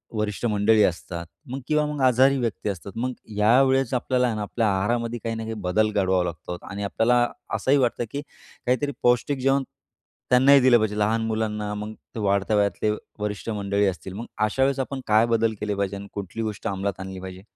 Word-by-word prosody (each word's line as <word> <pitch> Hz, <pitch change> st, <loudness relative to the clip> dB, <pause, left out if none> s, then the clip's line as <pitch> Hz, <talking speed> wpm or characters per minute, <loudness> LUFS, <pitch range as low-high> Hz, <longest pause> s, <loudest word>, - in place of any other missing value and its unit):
वरिष्ठ 105 Hz, +1 st, -2 dB
मंडळी 105 Hz, 0 st, +4 dB
असतात 85 Hz, -1 st, -2 dB, 0.3 s
मग 135 Hz, -, -3 dB
किंवा 150 Hz, -1 st, +2 dB
मग 150 Hz, -1 st, -3 dB
आजारी 130 Hz, +2 st, +5 dB
व्यक्ती 115 Hz, -3 st, -2 dB
असतात. 100 Hz, 0 st, -6 dB
मग 125 Hz, +2 st, -2 dB, 0.2 s
या 115 Hz, +5 st, +5 dB
वेळेस 135 Hz, -1 st, +2 dB
आपल्याला 125 Hz, 0 st, +1 dB
आहे 115 Hz, -, -1 dB
ना, 105 Hz, -, -3 dB
आपल्या 110 Hz, +2 st, -1 dB
आहारामध्ये 115 Hz, +4 st, -1 dB
काही 115 Hz, 0 st, -2 dB
ना 115 Hz, -, -4 dB
काही 115 Hz, -, -4 dB
बदल 105 Hz, +4 st, +1 dB
घडवावा 95 Hz, -3 st, +2 dB
लागतो 90 Hz, +1 st, -5 dB
आणि 100 Hz, +1 st, -5 dB
आपल्याला 120 Hz, +4 st, +2 dB, 0.3 s
असंही 130 Hz, +6 st, +3 dB
वाटतं, 125 Hz, -3 st, +1 dB
की 145 Hz, -, -3 dB, 0.4 s
काहीतरी 130 Hz, +4 st, +1 dB
पौष्टिक 125 Hz, +3 st, +2 dB
जेवण 135 Hz, +1 st, +2 dB, 0.7 s
त्यांनाही 135 Hz, +3 st, +7 dB
दिलं 125 Hz, -2 st, +6 dB
पाहिजे. 110 Hz, -2 st, -1 dB
लहान 110 Hz, +2 st, +2 dB
मुलांना 105 Hz, -2 st, -2 dB
मग 105 Hz, +1 st, -5 dB, 0.2 s
ते 115 Hz, -, -3 dB
वाढत्या 100 Hz, +1 st, +1 dB
वयातले 105 Hz, +1 st, +1 dB, 0.3 s
वरिष्ठ 105 Hz, +1 st, -4 dB
मंडळी 100 Hz, -1 st, 0 dB
असतील. 95 Hz, 0 st, -4 dB
मग 110 Hz, +5 st, -6 dB, 0.2 s
अशा 130 Hz, +5 st, +1 dB
वेळेस 135 Hz, 0 st, +1 dB
आपण 135 Hz, 0 st, -3 dB
काय 110 Hz, +2 st, +5 dB
बदल 115 Hz, 0 st, +1 dB
केले 105 Hz, -1 st, -2 dB
पाहिजे 100 Hz, 0 st, -2 dB
आणि 100 Hz, 0 st, -8 dB
कुठली 100 Hz, +2 st, -5 dB
गोष्ट 105 Hz, -2 st, -4 dB
अंमलात 100 Hz, 0 st, -2 dB
आणली 95 Hz, 0 st, -6 dB
पाहिजे? 95 Hz, 0 st, -8 dB
110 Hz, 195 wpm, -24 LUFS, 100-125 Hz, 0.7 s, त्यांनाही